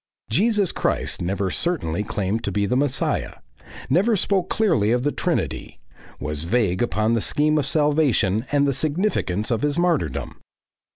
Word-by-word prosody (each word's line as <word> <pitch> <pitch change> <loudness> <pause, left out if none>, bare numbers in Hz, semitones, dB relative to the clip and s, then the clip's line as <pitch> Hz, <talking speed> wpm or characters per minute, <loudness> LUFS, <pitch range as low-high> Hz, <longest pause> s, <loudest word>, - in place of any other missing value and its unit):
Jesus 205 - +2
Christ - - -1
never 95 +2 -1
certainly 105 - -1
claimed 105 +1 -2
to - - -2
be 100 -1 0
the 115 - 0
Messiah; 135 0 0 0.5
never 200 - +3
spoke 190 -1 0
clearly 165 - +2
of 125 +1 +1
the 145 - +1
Trinity; - - -3 0.4
was 75 +1 -4
vague 100 -2 +1
upon 110 -1 +1
the 115 - +1
scheme 150 +5 +1
of 135 - -1
salvation 140 - +2
and 145 -1 +3
the 140 - +1
significance 145 - -1
of 115 -1 0
his 145 +1 0
martyrdom. 165 - -1
130 Hz, 155 wpm, -22 LUFS, 105-160 Hz, 0.5 s, never